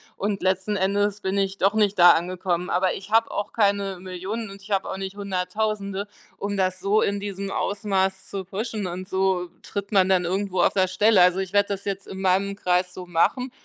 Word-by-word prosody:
und 200 -1 -2
letzten 190 +2 +1
Endes 200 +1 0
bin 190 +1 -1
ich 195 0 -1
doch 195 +1 +2
nicht 210 -2 +2
da 175 -1 +9
angekommen. 180 +1 -1
Aber 180 +1 +1
ich 190 +1 -8
habe 225 +1 +3
auch 205 - -3
keine 200 -3 +1
1.000.0000 190 +4 -5
und 200 0 -12
ich 195 - -14
habe 195 -2 0
auch 190 - -4
nicht 195 0 -5
100.000, 200 +1 -2 0.3
um 205 0 -3
das 185 -1 0
so 205 +3 +2
in 200 0 0
diesem 200 -1 -5
Ausmaß 195 -2 -1
zu 195 -2 -5
pushen, 210 +2 -4
und 185 +1 -5
so 190 -2 0
tritt 200 0 -5
man 190 -3 +4
dann 185 -2 +2
irgendwo 185 0 -1
auf - - +3
der 190 -1 +3
Stelle. 205 +3 +3
Also, 180 +1 +3
ich 190 0 -4
werde 205 0 +3
das 200 -1 -3
jetzt 195 -1 -4
in 190 0 -7
meinem 195 +1 +1
Kreis 180 -2 0
so 180 -1 -8
machen 245 +10 +1
195 Hz, 210 wpm, -24 LUFS, 185-200 Hz, 0.3 s, da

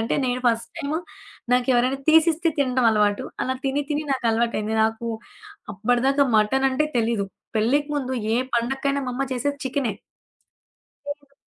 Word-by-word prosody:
అంటే 225 - 0
నేను 250 0 -1
first 230 -1 -1
time 300 -1 -2 0.6
నాకెవరైనా 250 +1 +2
తీసిస్తే 320 +1 +4
తినడం 255 -3 +2
అలవాటు. 210 -1 +2 0.2
అలా 260 - -1
తిని 275 +2 0
తిని 295 +1 0
నాకు 260 -2 -3
అలవాటైంది. 225 -1 0
నాకు 225 +1 -2 0.7
అప్పడదాకా 245 +7 +2
మటనంటే 265 +7 +2
తెలీదు. 225 -3 0 0.3
పెళ్ళికి 280 +7 +2
ముందు 260 -2 -2 0.2
ఏ - - +2 0.2
పండకైనా 270 +4 0
మా - - -2
అమ్మ 265 - -1
చేసేది 285 +3 -2
చికెనే. 260 -3 -1 1.1
చేయదు. 285 -1 -7
255 Hz, 135 wpm, -23 LUFS, 230-280 Hz, 1.1 s, తీసిస్తే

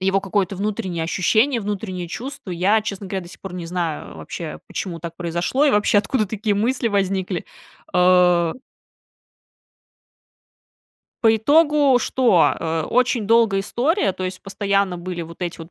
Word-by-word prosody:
его 195 +1 +1
какое-то 195 -1 -1
внутреннее 190 -5 -2
ощущение, 220 - +2
внутреннее 195 -3 -4
чувство. 240 +1 -7
Я, 190 +5 +2
честно 200 -2 -5
говоря, 190 -1 -3
до 170 - -12
сих - - -14
пор 190 -2 -8
не 170 -2 -5
знаю 170 -3 -4
вообще, 160 -3 -7
почему 170 -4 -5
так 170 0 -7
произошло, 175 - 0
и 290 - +5
вообще, 205 -1 +3
откуда 215 +2 0
такие 210 +1 -1
мысли 235 +3 0
возникли. 190 -3 -1 0.5
Э 180 -2 +4 2.7
По 225 -1 +5
итогу 290 +1 +4
что? 235 -10 +3
Э. 160 -1 -1
Очень 250 -3 +1
долгая 225 -3 +4
история, 255 - 0
то 185 - -5
есть 185 0 -5
постоянно 195 -2 0
были 175 0 -5
вот 170 +2 -10
эти 175 0 -4
вот 165 +1 -10
195 Hz, 150 wpm, -21 LUFS, 180-220 Hz, 2.7 s, и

